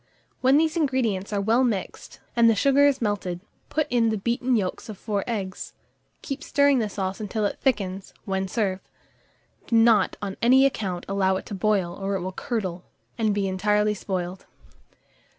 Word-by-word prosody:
When 260 +2 +4
these 315 +1 +2
ingredients 250 - 0
are 205 - 0
well 225 +6 +3
mixed, 220 -7 -3 0.2
and 235 -1 +5
the 225 - +3
sugar 280 +5 +4
is 275 -4 0
melted, 195 -4 -2 0.3
put 310 -1 0
in 235 -2 +3
the 220 - 0
beaten 240 +4 0
yolks 195 0 -2
of 210 - -7
4 205 -1 -2
eggs; 200 -5 -4 0.5
keep 275 -1 -5
stirring 280 -2 +3
the 215 -2 -1
sauce 190 -1 -3
until 215 0 -2
it - - -2
thickens, 195 -7 -1
when 190 -1 -1
serve. 190 -3 -1 0.9
Do 230 - 0
not, 225 -3 +4
on 195 -2 -5
any 260 +3 +6
account, 195 -9 -2
allow 190 -1 +1
it 190 - -5
to - - -8
boil, 195 -3 0
or 195 +1 -3
it 190 - -2
will 185 +1 -4
curdle, 185 -5 -4 0.4
and 220 -2 +2
be 200 -1 0
entirely 210 +2 +1
spoiled. 185 -3 -5
210 Hz, 175 wpm, -25 LUFS, 190-240 Hz, 0.9 s, any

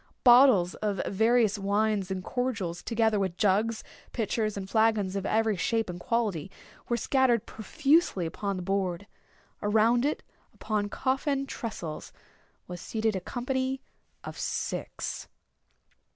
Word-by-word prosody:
Bottles 240 -8 +6
of 205 -3 -2
various 220 0 +2
wines 200 0 0
and 190 -1 -3
cordials, 215 -10 -2
together 225 -2 +1
with 190 -3 -2
jugs, 215 +3 +1 0.3
pitchers, 215 -2 -1
and 190 -1 -5
flagons 220 -3 +2
of 195 0 -2
every 220 -1 +2
shape 225 +1 0
and 175 - -8
quality, 205 -5 -1 0.4
were 240 - +1
scattered 245 -2 +2
profusely 275 - +1
upon 200 +4 -3
the 185 - -5
board. 190 -1 -1 0.6
Around 220 +3 +3
it, 295 - -1 0.3
upon 210 -2 -2
coffin 275 +3 -1
tressels, 195 - -6 0.6
was 180 -1 -7
seated 220 -1 -1
a 190 - -2
company 260 +5 -2 0.4
of - - -8
six. - - -4
215 Hz, 125 wpm, -28 LUFS, 195-240 Hz, 0.6 s, Bottles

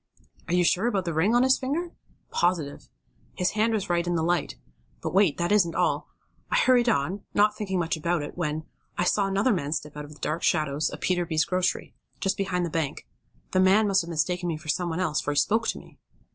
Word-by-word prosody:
"Are 175 - +1
you 180 - +4
sure 185 +6 +2
about 195 -6 0
the 170 - -2
ring 185 +9 +2
on 245 - +5
his 260 0 +4
finger?" 315 +7 -2 0.4
"Positive. 170 -5 -1 0.5
His 180 - 0
hand 220 +2 +1
was 205 -3 -1
right 175 0 0
in 175 - 0
the 160 - 0
light. 175 -1 0 0.4
But - - -4
wait, 190 -5 +3
that 175 +1 -1
isn't 185 -6 +3
all. - - 0 0.4
I - - 0
hurried 250 - +4
on, 190 0 0
not 210 +1 +4
thinking 190 -3 -2
much 170 -2 0
about 170 0 -1
it, 145 - -7
when, 155 -2 -2 0.3
I - - +1
saw 195 +2 +2
another 200 +5 +2
man 150 -5 -2
step 150 -1 -5
out 150 0 -6
of 150 +1 -12
the - - -18
dark 155 +3 -2
shadows 150 -2 +1
of - - -9
Peterby's 175 -3 +1
grocery, 185 0 -1 0.3
just 195 0 0
beyond 180 -3 -1
the 170 - -5
bank. 155 -3 -2 0.5
The 185 - +2
man 195 +3 +5
must 195 -1 +3
have 170 - -8
mistaken 175 +2 -1
me 160 - -2
for 155 0 -11
some 175 +3 0
one 165 +2 -3
else, 160 -5 0
for 145 - -2
he - - -7
spoke 225 +9 +2
to - - -1
me." - - -15
175 Hz, 230 wpm, -26 LUFS, 160-200 Hz, 0.5 s, on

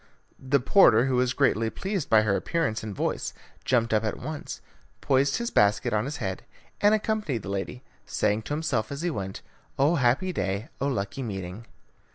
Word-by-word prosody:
The 135 +2 +2
porter, 125 - +5
who 130 -2 +1
was 125 0 +2
greatly 115 -5 +2
pleased 190 - -3
by 110 -1 +6
her 100 -2 +2
appearance 160 - -1
and 105 -3 -6
voice, - - -2 0.3
jumped 115 -3 +1
up 110 0 +2
at 110 - -2
once, 155 -1 -6 0.4
poised 135 +1 +2
his 235 0 -3
basket 105 +1 +3
on 105 +2 +1
his 145 +2 -4
head, 95 -8 -3 0.4
and 205 +1 +5
accompanied 210 - -1
the - - -6
lady, 100 +5 -4 0.2
saying 105 +1 +1
to - - -1
himself 135 -8 -1
as 140 +3 -5
he 175 - 0
went, 95 -7 -5 0.3
"Oh, 150 +5 +3
happy 135 +9 +2
day! 100 - -2
Oh, 140 - 0
lucky 100 -2 -2
meeting!" 100 -1 -6
125 Hz, 185 wpm, -26 LUFS, 105-145 Hz, 0.4 s, by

